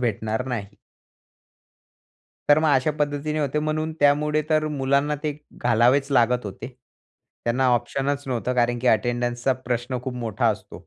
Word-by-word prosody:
भेटणार 110 0 -1
नाही. 115 -6 -3 1.8
तर 145 - +7
मग 160 - +2
अशा 130 +3 +2
पद्धतीने 150 +1 -1
होते. 145 0 -1
म्हणून 155 +1 -2
त्यामुळे 150 +1 +3
तर 155 0 +2
मुलांना 140 +1 +1
ते 150 -2 -2 0.2
घालावेच 125 +4 +3
लागत 125 -1 +3
होते. 100 +5 -7 0.8
त्यांना 125 +3 +1
ऑप्शनच 140 +3 -2
नव्हतं. 125 -1 -1
कारण 120 0 +1
की 125 - -4
अटेंडन्सचा 120 +3 +1 0.2
प्रश्न 125 +1 -1
खूप 130 0 -4
मोठा 115 -4 -1
असतो. - - -5
130 Hz, 140 wpm, -24 LUFS, 120-145 Hz, 1.8 s, तर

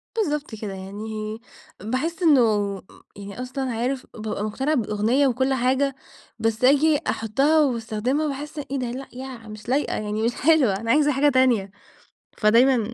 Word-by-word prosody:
بالضبط 300 - -2
كده 210 -2 -6
يعني 215 +3 -6 0.4
باحس 290 - -2
إنه 290 -6 +6 0.4
م - - -15 0.3
يعني 200 +4 -8
أصلًا 255 0 -3
عارف، 250 +3 -2
بابقى 215 -2 -4
مقتنعة 265 +8 -1
بالأغنية 230 +4 +1
وكل 260 +1 +1
حاجة 260 +2 +1 0.4
بس 225 +1 -1
أجي 290 +3 +5
أحطها 275 +9 +2
واستخدمها 250 +2 0
باحس 295 +2 -6
إيه 275 -1 -4
ده؟ 240 -2 -3
لأ، 265 +2 -6
يع 250 -3 -8
مش 215 +2 -10
لايقة 280 +3 +1
يعني 215 +1 -3
مش 235 +1 0
حلوة 280 -9 +3
أنا 230 +1 -1
عايزة 295 +1 +4
حاجة 285 +2 +3
تانية. 245 -7 +2 0.7
فدايمًا 235 +1 +3
250 Hz, 155 wpm, -23 LUFS, 220-280 Hz, 0.7 s, إنه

